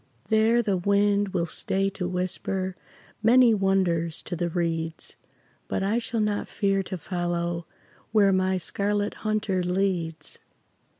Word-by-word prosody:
There 225 +2 +4
the 200 -4 +1
wind 200 +2 +2
will 180 -3 -1
stay 195 +4 -1
to 180 -2 -3
whisper 185 +1 -2 0.5
Many 240 +1 +6
wonders 185 -5 +1
to - - -4
the 175 0 -1
reeds; 165 -1 -2 0.5
But - - -1
I 210 +4 +1
shall 230 -1 -2
not 210 -1 0
fear 195 -1 +1
to 185 0 -5
follow 175 -1 -2 0.4
Where 205 -3 +5
my 185 0 +2
Scarlet 205 +3 -1
Hunter 215 -3 -1
leads. 180 -3 -1
190 Hz, 130 wpm, -26 LUFS, 175-205 Hz, 0.5 s, Many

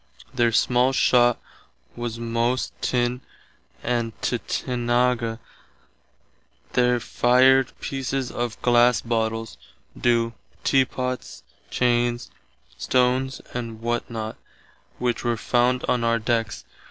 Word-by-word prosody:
Their 120 -2 +2
small 125 +3 +3
shott 120 -2 +4 0.6
were 120 0 -3
most 115 +2 -1
Tinn 125 0 0 0.6
and 115 -2 -2
Tuthenage 120 - -2
[tutenaga, 120 -2 +1
spelter]. - - -28 1.3
They 125 0 +3
fired 130 +2 +4
pieces 135 -1 -3
of 120 -1 -3
glass 120 0 +4
bottles, 115 - -2 0.4
do. 115 -1 +1 0.3
teapots, 130 -1 -1 0.3
chains, 120 -1 0 0.5
stones 125 - +1
and 115 -2 -5
what 120 +1 -2
not, 110 -1 -5 0.6
which 120 -2 -1
were 120 -1 0
found 125 +2 +1
on 120 -1 +1
our 115 0 +2
decks. 115 -1 -2
120 Hz, 105 wpm, -24 LUFS, 115-125 Hz, 1.3 s, shott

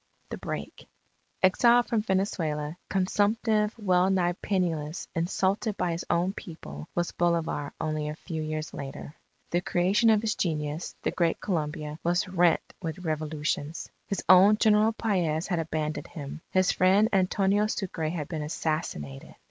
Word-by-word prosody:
THE - - -3
BREAK - - -6 0.6
Exiled 235 +6 +5
from 225 -2 0
Venezuela, 170 -7 -1
consumptive, 210 +3 +1
wellnigh 185 -3 +2
penniless, 170 -5 -1
insulted 190 +5 0
by 175 - 0
his 165 +2 -3
own 175 +3 +1
people, 75 - -9
was 175 0 0
Bolivar 170 -4 0
only 155 -1 -2
a 150 - -5
few 160 -1 -5
years 155 0 -4
later. 140 +1 -7 0.4
The 175 - +2
creation 185 +6 +2
of 215 -1 +4
his 220 -1 0
genius, 155 -1 -2
the - - +1
Great 170 -2 +1
Colombia, 150 -3 -3
was 175 +2 +1
rent 175 -2 +3 0.2
with 170 +1 -5
revolutions. 155 0 -2 0.2
His 200 - -3
own 190 +4 +7
General 215 0 +4
Paez 175 -8 0
had 175 -5 -1
abandoned 155 -1 -3
him. 150 -1 -8
His 185 -1 +3
friend 195 +4 +4
Antonio 195 +2 +2
Sucre 175 -7 -2
had 155 -3 -4
been 160 -3 -4
assassinated. 150 - -4
175 Hz, 140 wpm, -28 LUFS, 155-195 Hz, 0.6 s, own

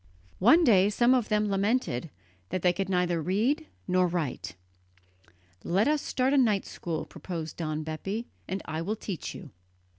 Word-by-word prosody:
One 255 - +6
day 200 - +5
some 240 +4 +4
of 250 -4 +1
them 210 -1 +2
lamented 195 - 0 0.4
that 185 - -3
they 180 -1 +4
could 195 +1 -3
neither 180 -2 +1
read 230 - 0 0.2
nor 180 0 +3
write. 160 - -3 1.1
"Let 195 +7 +2
us 300 -1 +2
start 260 +2 0
a 285 - +5
night 215 -6 +2
school," 165 -3 -4
proposed 165 -4 -6
Don 155 -2 -2
Bepi, 195 +9 -4 0.2
"and 190 +1 -3
I 160 0 -3
will 205 +6 -2
teach 200 -5 -5
you." 160 -8 -10
190 Hz, 160 wpm, -28 LUFS, 170-225 Hz, 1.1 s, One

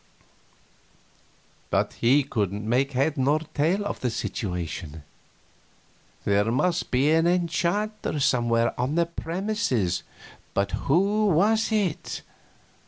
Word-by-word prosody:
But - - 0
he 135 +5 +3
couldn't 105 -4 -2
make 135 +4 +1
head 140 +3 +1
or 140 +4 +3 0.2
tail 175 +8 +1
of - - -3
the 125 - -1
situation. 85 -8 -4 1.2
There 100 +2 +2
must 170 +8 0
be 135 +4 +2
an 165 +1 +4
enchanter 180 +2 0
somewhere 120 -4 +2
on 130 +5 0
the 170 0 +3
premises, 170 - -1 0.5
but 100 0 +1
who 200 +8 +2
was 210 +6 +3
it? 205 -7 -1
145 Hz, 105 wpm, -25 LUFS, 115-180 Hz, 1.2 s, an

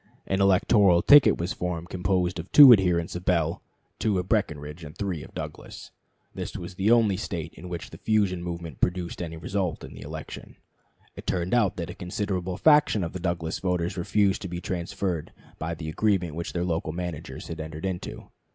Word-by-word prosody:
An 95 +1 0
electoral 95 -1 +4
ticket 145 -1 +7
was 85 +2 -2
formed, 90 -1 -4
composed 90 0 0
of 85 - -8
two 140 -4 +11
adherents 90 -5 +1
of 90 - -5
Bell, 85 -3 +1 0.4
two 105 -3 +1
of 90 0 -2
Breckinridge, 75 -6 -2
and 75 0 -10
three 95 -6 -3
of - - -13
Douglas. - - -8 0.4
This - - -5
was - - -7
the 95 +4 0
only 115 -5 +4
State 85 -6 -5
in 90 +3 -10
which 85 -2 -6
the - - -11
fusion 100 -5 +1
movement 85 -4 -6
produced 90 -1 -1
any 80 -2 -5
result 90 +1 -2
in - - -9
the - - -11
election. 80 +2 -8 0.6
It - - -10
turned 90 +1 -1
out 105 -6 +3
that 85 -3 -5
a - - -7
considerable 90 -1 -3
fraction 150 - +4
of 85 - -4
the 95 - -5
Douglas 85 -2 -2
voters 90 -1 -1
refused 95 +2 +1
to - - -4
be 85 0 -5
transferred 90 -1 -3 0.3
by 80 +1 -3
the 80 -1 -7
agreement 90 -1 0
which 85 +2 -5
their 85 0 -1
local 80 -2 -2
managers 85 -3 -6
had 85 - -6
entered 80 +2 -6
into. 95 -2 -5
90 Hz, 190 wpm, -26 LUFS, 85-95 Hz, 0.6 s, two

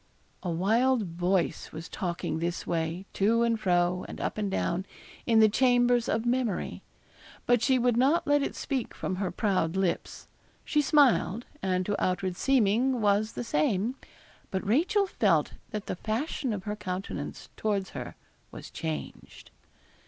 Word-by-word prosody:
A 180 - -3
wild 225 +8 +2
voice 175 0 -1
was 160 +2 -7
talking 175 -4 -3
this 170 +1 -2
way, 165 +2 -2
to 225 +4 +3
and 230 -1 +1
fro, 180 -2 +1
and - - -8
up - - -2
and 205 -2 -1
down, 185 0 -1 0.4
in 225 -1 +5
the 220 - +8
chambers 245 +1 +3
of 225 +1 0
memory. 240 -4 -1 0.6
But 245 -2 +3
she 260 +1 +3
would 245 -1 +2
not 275 +8 +3
let 290 0 +3
it - - -2
speak 265 -5 -3
from 185 - -3
her 190 -1 -1
proud 185 -5 0
lips. 190 -3 -2 0.4
She 300 - +2
smiled, 265 - +3 0.2
and 185 -1 0
to 205 +1 -1
outward 185 0 0
seeming, 250 +2 +2
was 210 +1 +2
the - - -4
same; 200 +4 +1 0.6
but 190 +1 -3
Rachel 335 - +2
felt 380 - +1 0.2
that 210 -1 -5
the - - -3
fashion 235 - -2
of 200 -3 -3
her 210 +1 -3
countenance 190 -2 -5
towards 200 -3 -1
her - - -7 0.3
was - - -10
changed. 75 -4 -6
210 Hz, 155 wpm, -28 LUFS, 185-245 Hz, 0.6 s, the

